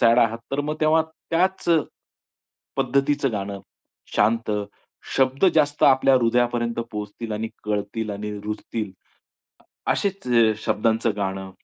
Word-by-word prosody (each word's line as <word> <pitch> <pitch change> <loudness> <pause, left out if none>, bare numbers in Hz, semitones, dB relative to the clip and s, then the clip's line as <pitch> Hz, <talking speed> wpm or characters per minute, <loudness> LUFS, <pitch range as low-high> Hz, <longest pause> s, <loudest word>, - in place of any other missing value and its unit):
Sad 115 +1 +5
आहात. 115 -1 +3
तर 140 - +1
मग 150 +1 -2
तेव्हा 155 +1 +4 0.3
त्याचं 170 -2 +2 0.9
पद्धतीचं 135 0 +1
गाणं 100 -1 -4 0.6
शांत, 115 +2 +2 0.7
शब्द 135 +4 +2
जास्त 145 -1 +2
आपल्या 135 0 +5
हृदयापर्यंत 120 -1 +1
पोहोचतील 105 +2 -5
आणि 110 +1 -2 0.2
कळतील 105 +1 -2
आणि 105 +1 -4
रुजतील 105 0 -4 1.0
असेच 195 -1 -1 0.4
शब्दांच 115 +2 +1
गाणं, 95 -1 -3
115 Hz, 110 wpm, -23 LUFS, 105-140 Hz, 1.0 s, Sad